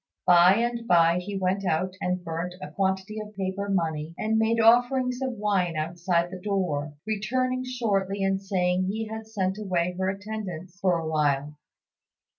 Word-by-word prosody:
By 180 +1 +7
and 235 +1 -1
by 170 0 +5
he 195 +2 -5
went 190 +1 0
out 180 +1 0
and 180 0 -1
burnt 170 +2 -4
a - - -8
quantity 190 +2 -1
of 210 0 -8
paper 195 +1 -2
money 165 -4 -1
and 220 +1 +1
made 225 +1 +2
offerings 245 +2 +4
of 260 -1 -1
wine 200 -6 0
outside 170 +2 0
the 185 - -7
door, 175 -8 -1
returning 255 +4 -1
shortly 200 -6 -1
and 195 0 +1
saying 185 -2 0
he 220 +3 -2
had 220 0 -7
sent 195 -2 -2
away 180 -3 -1
her 190 0 +1
attendants 195 -3 -6
for 185 -3 +2
a 165 -1 -4
while. 150 -2 0
190 Hz, 165 wpm, -26 LUFS, 175-215 Hz, -, By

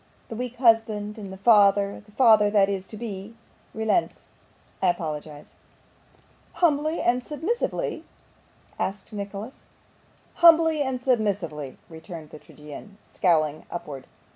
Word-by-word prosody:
The 225 - -6
weak 250 +1 -5
husband 225 -3 +2
and 200 -2 -8
the 190 - -8
father 200 -1 +4
the 210 - -21
father 220 -4 +5
that 200 -2 +3
is 195 -1 -3
yet - - -26
to 215 - -8
be 210 -1 -7 0.4
relents. 220 +9 -1 0.6
I 190 - +2
apologise.' 155 -3 -4 1.0
'Humbly 310 -1 +1
and 245 +1 +1
submissively?' 325 - -3 0.8
said 195 +1 -2
Nicholas. 205 +3 -7 0.8
'Humbly 325 -2 +6
and 265 -2 -1
submissively,' 200 - -1
returned 160 -1 -10
the 155 - -10
tragedian, 150 +9 -12
scowling 155 -5 0
upwards. 140 -6 -7
205 Hz, 120 wpm, -25 LUFS, 180-245 Hz, 1.0 s, Humbly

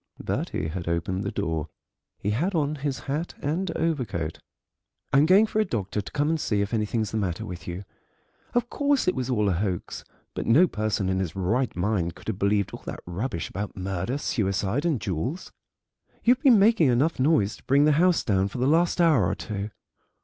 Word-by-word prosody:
Bertie 80 - -2
had 85 +1 -5
opened 85 +3 -1
the - - -2
door; 80 -6 -2 0.5
he 105 - -2
had 170 - 0
on 150 -2 +1
his 140 -1 -3
hat 150 +5 -3
and 170 +6 -1
overcoat. 105 - -2 0.7
"I'm 140 +3 +5
going 195 +5 +6
for 215 - -2
a - - +5
doctor 105 - -2
to 100 - -10
come 145 0 0
and 160 0 +1
see 105 -7 0
if 100 +3 -2
anything's 110 -1 -1
the 110 - -2
matter 90 -5 -2
with 90 0 -8
you. 90 +2 -5 0.7
Of 245 -1 +2
course 285 -2 +1
it 185 - +4
was 130 -1 -3
all 105 -5 +1
a - - +3
hoax, 90 0 -3 0.3
but - - -4
no 145 +11 +6
person 110 - -1
in 95 0 0
his 90 -3 -3
right 110 +8 0
mind 90 -2 -1
could - - -8
have 100 -3 -3
believed 100 0 +1
all - - -7
that - - -6
rubbish 90 +2 -3
about 100 +1 -5
murder 95 +4 -2
and 145 - -3
suicide 105 - 0
and 155 -8 +1
jewels. 105 - -3 0.7
You've 245 +2 +4
been 260 -6 +6
making 205 -5 +5
enough 130 +6 +2
noise 130 -7 +2
to - - -21
bring 140 +3 +4
the 155 - +5
house 180 -1 +3
down 95 -2 +1
for 100 - -7
the 125 - +1
last 165 +5 +3
hour 155 - +4
or - - -1
two." 105 -1 -5
110 Hz, 205 wpm, -26 LUFS, 95-155 Hz, 0.7 s, going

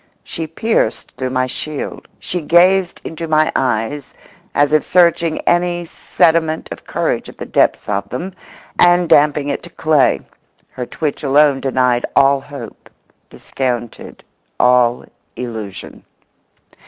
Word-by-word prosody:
She 160 - -5
pierced 160 - -1
through 130 -1 -4
my 130 0 0
shield; 145 +3 -6
she 180 - -4
gazed 175 +3 +3
into 165 +1 -6
my 155 0 +2
eyes 130 +3 -2 0.4
as 145 +1 +2
if 155 - +4
searching 170 -2 +2
any 175 0 0
sediment 160 -1 0
of - - -8
courage - - -2
at - - -14
the - - -6
depths - - +1
of 100 -1 -2
them 180 +10 -5 0.5
and 175 0 +5
damping 145 -1 +3
it - - -2
to 170 - -12
clay. 155 -4 +2 0.5
Her 125 -1 -6
twitch 150 -3 -3
alone 140 0 +3
denied 125 -2 +1
all 135 0 +4
hope, 140 -5 -11 0.4
discounted 120 -3 -5 0.4
all 125 -1 +3 0.3
illusion. 110 -6 -7
145 Hz, 130 wpm, -17 LUFS, 125-165 Hz, 0.5 s, and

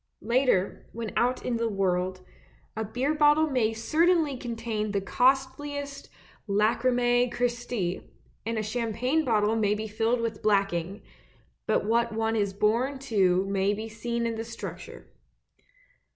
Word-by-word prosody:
Later, 235 -4 +1
when 225 -1 -5
out 250 +1 +1
in 240 -2 0
the 230 0 0
world, 185 -2 -1 0.5
a 220 - -2
beer 250 +7 -1
bottle 300 +1 +4
may 235 -4 +2
certainly 310 +6 +2
contain 230 -4 -3
the 200 - +2
costliest 270 +5 0 0.4
Lacrimae 245 +4 +2
Christe, 245 0 -2 0.7
and 230 +1 -2
a 215 - -1
champagne 240 +7 0
bottle 215 -4 +2
may 210 -2 +2
be 215 +1 -4
filled 225 +3 0
with 225 -2 -3
blacking; 195 -2 0 0.6
but - - +1
what 235 +2 +2
one 225 0 0
is 200 -2 +1
born 230 +7 +1
to 195 -8 +2
may 195 +1 +1
be 220 +2 -5
seen 235 +2 -3
in 230 - -1
the 225 0 -4
structure. 230 0 -8
230 Hz, 135 wpm, -27 LUFS, 210-250 Hz, 0.7 s, bottle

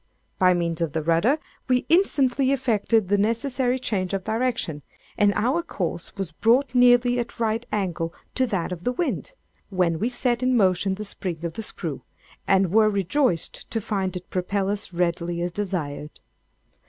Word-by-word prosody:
By 180 -1 +5
means 170 -1 -1
of 165 -4 -1
the 160 - -1
rudder 170 - +3 0.3
we 250 -1 +2
instantly 275 -7 +3
effected 230 -5 +1
the 205 +1 +2
necessary 250 +4 +1
change 195 -6 -2
of 190 - -3
direction, 220 -9 -1 0.3
and 205 -1 +4
our 260 +10 +1
course 175 - -4
was 195 -4 -4
brought 240 - +2
nearly 245 0 +5
at 235 0 -5
right 225 0 0
angles 175 -5 -1 0.2
to 260 - +1
that 195 -6 -2
of 175 -1 -6
the 245 - +1
wind; 355 - -3 0.3
when 180 -4 +1
we 230 - +1
set 245 -1 0
in 255 -1 +2
motion 190 -1 +2
the 210 +2 -6
spring 175 -4 -5
of 165 - -3
the 225 - -5
screw, 160 - -5 0.5
and 190 -2 +3
were 215 +1 +5
rejoiced 200 - 0
to 225 - -1
find 195 -3 -2
it 180 - -12
propel 190 +2 -1
us 205 -2 -4
readily 170 0 -1
as 175 +1 -1
desired. 165 -7 -4
205 Hz, 170 wpm, -24 LUFS, 175-245 Hz, 0.5 s, By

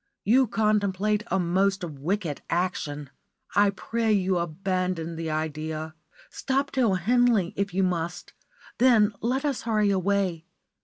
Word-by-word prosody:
You 250 +5 +4
contemplate 210 -1 +1
a 190 - 0
most 190 +2 +1
wicked 165 +1 -3
action. 150 -5 -2 0.4
I 205 0 +4
pray 225 +3 -1
you 190 -3 +2
abandon 175 0 -2
the 165 0 -4
idea. 155 0 -3 0.4
Stop 275 +1 -1
till 235 -8 +2
Henley, 225 -1 +2
if 200 0 -1
you 190 +2 +1
must; 180 -1 -3 0.5
then 225 -4 +5
let 255 +5 -1
us 280 -4 -1
hurry 215 -3 +1
away. 190 -3 0
190 Hz, 125 wpm, -26 LUFS, 170-215 Hz, 0.5 s, then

